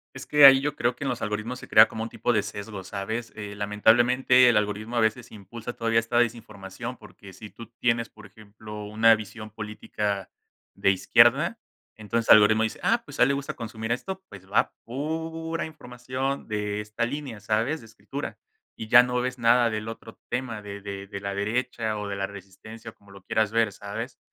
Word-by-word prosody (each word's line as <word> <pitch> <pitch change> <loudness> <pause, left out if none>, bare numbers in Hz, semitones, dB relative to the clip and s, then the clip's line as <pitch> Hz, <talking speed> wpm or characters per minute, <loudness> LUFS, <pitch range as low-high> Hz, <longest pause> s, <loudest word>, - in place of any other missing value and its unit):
Es - - -8
que 150 -1 +6
ahí 135 -1 +10
yo 145 +1 -2
creo 120 -2 0
que 145 - -6
en - - 0
los 125 - -3
algoritmos 110 +4 -3
se - - -12
crea 110 +1 +8
como 110 - -5
un 115 - -5
tipo 120 - -1
de 105 -3 +2
sesgo, 100 -1 -7
¿sabes?, 110 +5 -5
eh, 100 -1 -7
lamentablemente, 120 +5 +4
el 115 - +4
algoritmo 105 +3 -2
a - - +4
veces 110 +2 0
impulsa 110 +3 -8
todavía 115 -1 +1
esta 115 +1 -2
desinformación, 115 0 -3
porque 100 -2 -14
si 105 +2 -11
tú 115 - -12
tienes, 115 -1 +1
por 110 - -15
ejemplo, 105 +1 -11
una 110 +2 +5
visión 110 0 -9
política 105 -2 -4 0.5
de 100 - +3
izquierda, 120 - +4 0.4
entonces 115 +2 -3
algoritmo 110 +1 +7
dice: 110 - -3
"Ah, 230 0 +2
pues, - - -11
a - - +7
él 125 - +4
le 140 - +2
gusta 140 0 -4
consumir 110 0 -4
esto, 190 +9 -5
pues 95 0 -14
va", 105 - +2
pura 160 +5 -4
información 130 -2 -5
de 105 -1 -2
esta 105 +2 -3
línea, 135 -3 -5
¿sabes?, 110 +9 0
de 115 - -14
escritura, 125 +5 -7 0.4
y 110 - -8
ya 120 +2 +9
no 125 0 -1
ves 125 0 -3
nada 120 0 +4
del 110 0 -4
otro 115 0 -9
tema 120 -3 -3
de 100 0 -8
de 100 0 -7
de 100 - -6
la 100 0 -3
derecha 110 +1 -2
o 105 -1 -5
de 100 - -4
la 100 0 -2
resistencia, 100 +3 -11
o - - -30
como 100 -1 -21
lo 100 -1 -14
quieras 110 +1 0
ver, 115 -2 +2
¿sabes?, 100 +1 -7
110 Hz, 200 wpm, -26 LUFS, 105-125 Hz, 0.5 s, ahí